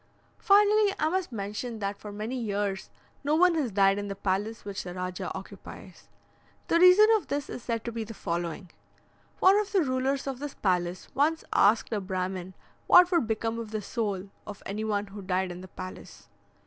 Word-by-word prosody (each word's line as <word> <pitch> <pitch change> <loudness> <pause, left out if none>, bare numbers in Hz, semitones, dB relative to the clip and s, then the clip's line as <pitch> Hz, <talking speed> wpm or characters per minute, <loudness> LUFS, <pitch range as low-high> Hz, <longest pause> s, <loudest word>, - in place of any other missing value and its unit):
Finally, 415 0 +5
I 310 - +1
must 370 -3 -2
mention 220 +2 -4
that 200 -1 -3
for 210 +1 -9
many 215 +5 -4
years 205 -4 -2 0.3
no 295 +2 +2
one 360 +2 +5
has 300 -7 0
died 195 0 +3
in 205 - -4
the 200 - -4
palace 200 +4 -2
which 200 -1 -4
the 180 0 -7
Rajah 180 0 -4
occupies. - - -12 0.6
The 335 - +4
reason 365 +4 +8
of 420 - -9
this 285 -1 -3
is - - -6
said 230 -1 -3
to 235 - -3
be 230 -1 -4
the 220 +1 -9
following: 170 +1 -4 0.7
"One 385 +2 +5
of 420 0 -3
the 380 -4 +4
rulers 265 0 -1
of 270 -2 -4
this 290 0 -6
palace 180 -2 -1
once 310 +4 +1
asked 220 +3 +3
a 210 - -1
Brahmin 185 -1 -4 0.3
what 360 0 +7
would 335 -10 +2
become 225 +1 -2
of 225 -2 -6
the 215 0 -3
soul 200 -4 -3 0.2
of 205 -2 -9
any 210 +2 -4
one 210 -1 -1
who 200 0 -10
died 185 -1 -1
in 175 +1 -8
the 185 - -10
palace. 185 0 -10
215 Hz, 195 wpm, -28 LUFS, 195-280 Hz, 0.7 s, reason